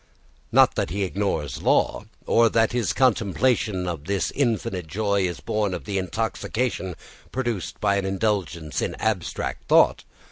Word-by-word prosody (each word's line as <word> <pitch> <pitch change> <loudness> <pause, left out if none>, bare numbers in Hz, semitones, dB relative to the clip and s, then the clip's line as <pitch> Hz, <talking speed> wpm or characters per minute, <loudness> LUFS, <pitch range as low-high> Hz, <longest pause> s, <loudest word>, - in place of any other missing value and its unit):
Not - - +6
that - - -1
he 100 +5 -1
ignores 95 -8 -2
law, - - +2 0.2
or 115 0 +4
that 115 0 +2
his 120 -2 0
contemplation 110 -5 +1
of 80 -4 -4
this 100 -2 -1
infinite 105 - -1
joy 100 +3 0
is 85 - -6
born 105 -3 -1
of - - -7
the 100 -2 -1
intoxication 110 0 -2 0.4
produced 120 -8 -3
by 100 - +2
an 100 - -1
indulgence 95 -6 -1
in - - -2
abstract 110 -6 -2
thought. - - +4
100 Hz, 145 wpm, -24 LUFS, 90-110 Hz, 0.4 s, Not